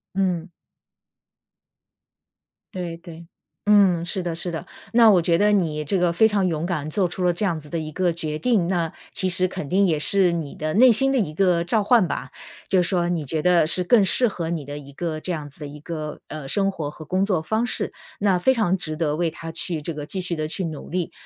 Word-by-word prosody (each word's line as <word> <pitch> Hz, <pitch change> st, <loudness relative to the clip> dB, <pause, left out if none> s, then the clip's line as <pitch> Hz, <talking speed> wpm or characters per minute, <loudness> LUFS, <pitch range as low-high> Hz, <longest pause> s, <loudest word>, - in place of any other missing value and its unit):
嗯。 180 Hz, -3 st, -1 dB, 2.2 s
对 175 Hz, -3 st, -5 dB
对， 170 Hz, -1 st, -12 dB, 0.4 s
嗯， 195 Hz, -5 st, +4 dB
是 190 Hz, +2 st, -2 dB
的 175 Hz, -2 st, -3 dB
是 175 Hz, +1 st, -4 dB
的， 160 Hz, -2 st, -5 dB, 0.3 s
那 230 Hz, -1 st, +6 dB
我 190 Hz, -4 st, +5 dB
觉 165 Hz, 0 st, +2 dB
得 210 Hz, +3 st, +3 dB
你 155 Hz, -6 st, 0 dB
这 190 Hz, +7 st, 0 dB
个 175 Hz, -1 st, +2 dB
非 195 Hz, +6 st, +4 dB
常 205 Hz, -3 st, +1 dB
勇 160 Hz, -2 st, -2 dB
敢 155 Hz, -4 st, -3 dB
做 185 Hz, +3 st, +1 dB
出 180 Hz, +1 st, -5 dB
了 180 Hz, -, +3 dB
这 190 Hz, +5 st, -2 dB
样 170 Hz, -5 st, -1 dB
子 150 Hz, -1 st, -12 dB
的 170 Hz, -, -2 dB
一 155 Hz, -1 st, -6 dB
个 180 Hz, +1 st, +1 dB
决 155 Hz, -2 st, -4 dB
定， 210 Hz, -3 st, +1 dB
那 170 Hz, -3 st, -1 dB, 0.2 s
其 185 Hz, -, 0 dB
实 185 Hz, +1 st, +3 dB
肯 180 Hz, -6 st, -6 dB
定 195 Hz, +2 st, +3 dB
也 165 Hz, -4 st, +1 dB
是 180 Hz, +3 st, +3 dB
你 160 Hz, -4 st, -4 dB
的 155 Hz, 0 st, -3 dB
内 245 Hz, +4 st, +7 dB
心 270 Hz, +4 st, +4 dB
的 270 Hz, -, +1 dB
一 180 Hz, -11 st, -1 dB
个 175 Hz, -1 st, +2 dB
召 210 Hz, +5 st, +1 dB
唤 225 Hz, -1 st, +4 dB
吧， -, -, -4 dB, 0.4 s
就 185 Hz, -2 st, +3 dB
说 175 Hz, -1 st, 0 dB
你 175 Hz, -3 st, -1 dB
觉 155 Hz, +3 st, -2 dB
得 175 Hz, -1 st, +4 dB
是 180 Hz, +3 st, +3 dB
更 220 Hz, +2 st, +5 dB
适 245 Hz, +6 st, +5 dB
合 170 Hz, -6 st, -4 dB
你 165 Hz, -4 st, -3 dB
的 145 Hz, +1 st, -6 dB
一 140 Hz, -1 st, -11 dB
个 155 Hz, +2 st, -4 dB
这 185 Hz, -, -3 dB
样 150 Hz, -4 st, -4 dB
子 145 Hz, -, -15 dB
的 150 Hz, -, -5 dB
一 145 Hz, +1 st, -10 dB
个， 155 Hz, -1 st, -6 dB
呃， 155 Hz, -2 st, -7 dB
生 195 Hz, +7 st, +1 dB
活 155 Hz, -6 st, -5 dB
和 155 Hz, -, -11 dB
工 185 Hz, +5 st, 0 dB
作 190 Hz, -5 st, 0 dB
方 220 Hz, +8 st, -1 dB
式， -, -, -3 dB, 0.3 s
那 200 Hz, -3 st, +2 dB
非 260 Hz, +9 st, +3 dB
常 215 Hz, -7 st, +1 dB
值 155 Hz, -4 st, -3 dB
得 150 Hz, -2 st, 0 dB
为 170 Hz, +1 st, 0 dB
它 165 Hz, +1 st, -8 dB
去 165 Hz, -1 st, -3 dB
这 165 Hz, +3 st, -5 dB
个 150 Hz, -1 st, -6 dB
继 190 Hz, -, -3 dB
续 180 Hz, -1 st, -2 dB
地 155 Hz, -1 st, -3 dB
去 185 Hz, +3 st, -3 dB
努 155 Hz, -3 st, -7 dB
力。 180 Hz, -1 st, -2 dB
175 Hz, 255 characters per minute, -23 LUFS, 155-190 Hz, 2.2 s, 内